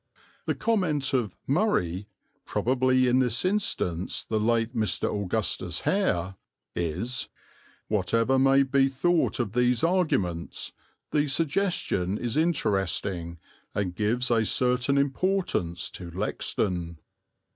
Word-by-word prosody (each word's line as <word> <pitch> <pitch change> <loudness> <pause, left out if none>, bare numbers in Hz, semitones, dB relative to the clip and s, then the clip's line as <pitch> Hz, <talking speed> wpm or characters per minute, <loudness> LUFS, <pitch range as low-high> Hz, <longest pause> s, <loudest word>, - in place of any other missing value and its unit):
The - - +1
comment 165 -12 0
of 115 -8 0
"Murray," 105 - 0 0.4
probably 130 0 +2
in 125 +1 +4
this 125 +3 +1
instance 185 - -1
the 110 - -1
late 115 +2 +1
Mr. 110 -2 0
Augustus 100 -3 -1
Hare, 95 +2 0 0.4
is 115 +9 -2 0.6
"Whatever 115 +6 +2
may 135 +1 +5
be 135 0 +3
thought 160 +4 +1
of 110 -4 -1
these 125 -1 +2
arguments, 100 - 0 0.4
the 150 0 +2
suggestion 145 - 0
is 120 0 -3
interesting 95 - 0 0.4
and 100 -3 -1
gives 115 +6 0
a 115 -1 +3
certain 125 +4 +2
importance 140 - 0
to 90 -2 -8
Lexden." 90 -2 -2
120 Hz, 110 wpm, -27 LUFS, 95-140 Hz, 0.6 s, may